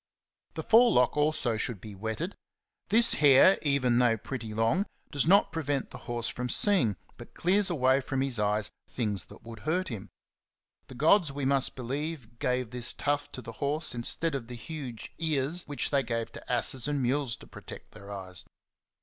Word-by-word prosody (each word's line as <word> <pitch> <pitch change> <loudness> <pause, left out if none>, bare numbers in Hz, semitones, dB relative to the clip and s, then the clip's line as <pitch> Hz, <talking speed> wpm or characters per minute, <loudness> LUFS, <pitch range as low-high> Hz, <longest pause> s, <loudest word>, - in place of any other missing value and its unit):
The - - -4
forelock 225 - +4
also 150 -6 +1
should 110 -1 -2
be 105 +2 -10
wetted; 110 - -4 0.6
this 230 +1 +6
hair, 145 +6 +6
even 130 -5 +2
though 120 -2 +3
pretty 115 0 -6
long, 115 - +1 0.2
does 145 0 0
not 200 +3 +5
prevent 145 -4 -2
the - - -9
horse 120 -1 -2
from 125 0 -4
seeing, 120 - +3 0.2
but - - -13
clears 195 +3 +2
away 135 -4 +2
from 135 0 -2
his 135 -4 -1
eyes 105 0 0 0.2
things 105 -5 -2
that - - -15
would 115 -1 -10
hurt 175 - -1
them. 105 -3 -7 0.8
The 130 - -11
gods, 155 +4 +4
we 140 -1 -4
must 135 -1 +1
believe, 130 -2 -5
gave 125 -2 -1
this 125 -1 +1
tuft 145 0 -2
to 130 - -7
the 115 - -7
horse 145 +2 +1
instead 130 +7 0
of 130 -4 -4
the 125 - -8
huge 125 -1 -8
ears 160 +1 0
which 145 -1 -1
the}^ 140 -2 +2
gave 115 -2 -3
to - - -9
asses 125 0 +1
and 145 -1 -1
mules 130 -1 0
to - - -15
protect - - -12
their 100 -1 -12
eyes. 95 -2 -5
130 Hz, 180 wpm, -28 LUFS, 115-150 Hz, 0.8 s, this